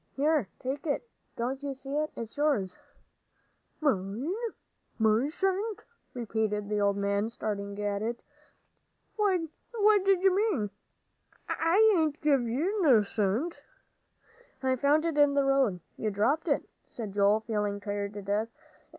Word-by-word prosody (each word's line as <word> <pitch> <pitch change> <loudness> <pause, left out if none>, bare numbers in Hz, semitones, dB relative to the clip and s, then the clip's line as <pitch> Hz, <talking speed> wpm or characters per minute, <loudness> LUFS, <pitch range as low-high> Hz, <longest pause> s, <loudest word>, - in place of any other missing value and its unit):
"Here, 295 -4 +2
take 275 +5 -4
it. 300 +11 -1 0.3
Don't 255 +4 -2
you 280 -1 -4
see 270 +1 -6
it? 305 +1 0
It's 230 -1 -7
yours." 275 -12 0 1.0
"Mine? 235 - 0 0.6
My 220 +5 +3
cent?" 385 +5 -1 0.3
repeated 215 -3 -1
the 210 -1 0
old 200 0 +2
man, 200 +2 0
staring 200 -3 -4
at 205 -1 -1
it. 235 +2 -2 1.0
"What 385 -6 +2 0.6
d'ye 385 -1 +4
mean? 370 - +1 0.8
I 415 +7 +4
hain't 315 -3 +1
give 290 -4 +3
ye 275 +9 0
no 260 - +5
cent." 215 - -1 1.0
"I 260 0 +2
found 290 +5 +3
it 320 -3 0
in 290 -1 +5
the 280 - +4
road. 270 -9 +2 0.2
You 215 - -1
dropped 240 - +1
it," 285 - +1 0.2
said 220 -4 -6
Joel, 205 +2 +3
feeling 210 -2 -2
tired 205 0 -3
to 205 - -6
death. 205 +3 0
250 Hz, 135 wpm, -29 LUFS, 205-305 Hz, 1.0 s, no